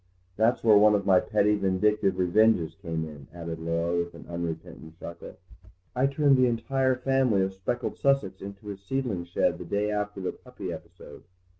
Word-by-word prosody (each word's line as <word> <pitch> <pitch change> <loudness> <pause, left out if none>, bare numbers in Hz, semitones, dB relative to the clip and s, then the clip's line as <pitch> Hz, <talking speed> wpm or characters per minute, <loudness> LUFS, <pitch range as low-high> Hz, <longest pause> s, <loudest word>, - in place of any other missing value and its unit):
That's 110 +4 +2
where 110 -3 +7
one 105 0 +6
of 100 -1 -1
my 95 -2 +6
petty 105 +1 +2
vindictive 100 0 +1
revenges 90 -2 +3
came 80 -3 -4
in," 70 -3 -11
added 85 -1 -6
Laura 85 +1 -1
with 85 0 -2
an - - -12
unrepentant 85 -1 -6
chuckle; 85 - -9 0.6
"I 130 +2 +3
turned 140 -1 +3
the 130 -1 +4
entire 130 +3 +1
family 130 -6 +2
of 95 0 -2
speckled 95 +6 -3
Sussex 135 -9 +1
into 100 +1 -9
his 100 -1 -7
seedling 110 -5 -2
shed 85 - 0
the - - -5
day 105 +1 -1
after 105 -1 -3
the 95 - -2
puppy 100 -8 -8
episode." 85 +2 -12
100 Hz, 175 wpm, -27 LUFS, 85-115 Hz, 0.6 s, where